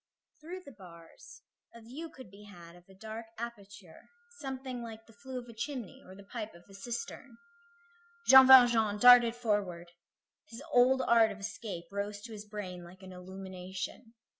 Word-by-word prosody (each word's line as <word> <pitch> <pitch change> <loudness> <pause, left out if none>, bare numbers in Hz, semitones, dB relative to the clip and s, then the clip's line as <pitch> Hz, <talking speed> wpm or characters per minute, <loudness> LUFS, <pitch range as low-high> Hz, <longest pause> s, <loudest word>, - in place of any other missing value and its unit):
Through 355 +4 -8
the 280 - -11
bars 185 - -15 0.3
a 230 - -12
view 275 +9 -8
could 260 -10 -14
be 205 +1 -15
had 175 -4 -14
of 175 +1 -20
a 190 - -16
dark 220 +3 -8
aperture, 205 -6 -10 0.3
something 260 -3 -6
like 225 -1 -9
the 225 - -19
flue 260 +5 -8
of 245 -1 -7
a 235 - -11
chimney, 240 -1 -6
or 185 - -13
the 200 - -13
pipe 215 -1 -7
of 170 - -16
a 195 - -17
cistern. 240 - -7 0.9
Jean 265 -1 +9
Valjean 240 -5 +7
darted 240 0 +7
forward. 200 -7 -2 0.6
His 230 +5 -10
old 260 0 +4
art 225 -2 +4
of 205 - -8
escape 200 -3 -6
rose 205 +1 -4
to 230 +2 -10
his 210 -1 -9
brain 195 -4 -7
like 185 +2 -15
an 185 - -10
illumination. 190 +4 -8
215 Hz, 170 wpm, -31 LUFS, 190-245 Hz, 0.9 s, Jean